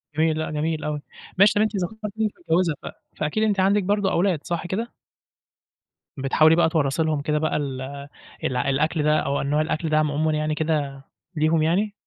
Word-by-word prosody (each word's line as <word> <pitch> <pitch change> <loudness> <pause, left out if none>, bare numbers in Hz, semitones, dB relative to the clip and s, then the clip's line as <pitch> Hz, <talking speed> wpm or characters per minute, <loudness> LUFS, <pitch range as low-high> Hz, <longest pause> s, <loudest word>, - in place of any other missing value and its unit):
جميل 160 0 +2
لأ، 160 - -3
جميل 155 0 -2
أوي. 150 -1 -3 0.4
ماشي 200 +2 +6
طب 205 - +2
أنتِ 215 -1 +1
ذكرتِ 210 +3 -4
إن - - +2
أنتِ 210 - -2
متجوزة 175 - +1
ف - - -6 0.3
فأكيد 155 +9 -1
أنتِ 205 -3 +1
عندِك 200 +2 +3
برضو 200 0 +1
أولاد 180 -3 +1
صح 170 0 -3
كده؟ 225 +6 -3 1.2
بتحاولي 155 +4 +4
بقى 170 -1 +3
تورّثي 160 -1 +1
لهم 155 -2 0
كده 150 +1 0
بقى 155 - 0
ال 135 -3 -3 0.6
الع 125 +1 0
الأكل 150 +3 +1
ده 150 0 +3
أو 140 - -1
نوع 145 +2 +1
الأكل 155 +1 -2
ده 155 - +2
عمومًا 155 +1 +1
يعني 155 0 -1
كده 145 -4 -2 0.3
ليهم 155 +1 +2
يعني؟ 195 +7 +1
155 Hz, 190 wpm, -23 LUFS, 150-185 Hz, 1.2 s, ماشي